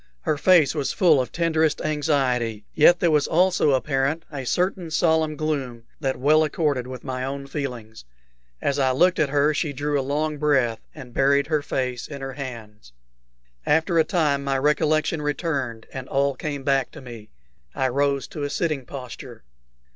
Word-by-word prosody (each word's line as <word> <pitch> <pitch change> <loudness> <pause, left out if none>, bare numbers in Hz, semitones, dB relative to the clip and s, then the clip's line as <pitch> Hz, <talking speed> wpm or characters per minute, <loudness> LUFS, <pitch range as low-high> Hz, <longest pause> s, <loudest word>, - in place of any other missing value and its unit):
Her 150 - 0
face 150 -1 +4
was 145 -3 -1
full 160 -7 +4
of 125 - -5
tenderest 160 -2 +1
anxiety, 130 -8 0
yet 175 +3 +5
there 170 -2 +2
was 150 -2 +2
also 180 -4 +3
apparent 135 +4 0
a 135 -4 -6
certain 180 +1 -1
solemn 160 -1 +1
gloom 135 -7 -3 0.2
that 135 -3 -1
well 155 +4 +4
accorded 145 -5 -1
with 130 0 -8
my 130 -1 -4
own 140 +1 -4
feelings. 125 - -6 0.6
As 140 0 0
I 130 -1 +2
looked 180 +7 +3
at 150 - +2
her 145 +2 +2
she 150 -1 -2
drew 145 +1 -1
a - - +1
long 150 +2 -2
breath, 135 -6 +2 0.2
and 130 -5 -11
buried 140 +2 +3
her 155 -2 0
face 125 -3 -3
in 140 -2 -8
her 135 0 -5
hands. 115 - -9 0.7
After 160 +2 +2
a - - +6
time 150 -5 0
my 135 -1 0
recollection 150 +2 +1
returned, 145 -6 -2
and 130 -1 -7
all 140 0 +1
came 140 +1 -5
back 135 -1 +1
to - - -10
me. 115 -4 -11 0.5
I 130 - +1
rose 140 0 0
to 150 - -7
a 145 - -2
sitting 145 -3 -2
posture. 125 -6 -9
140 Hz, 175 wpm, -23 LUFS, 130-155 Hz, 0.7 s, a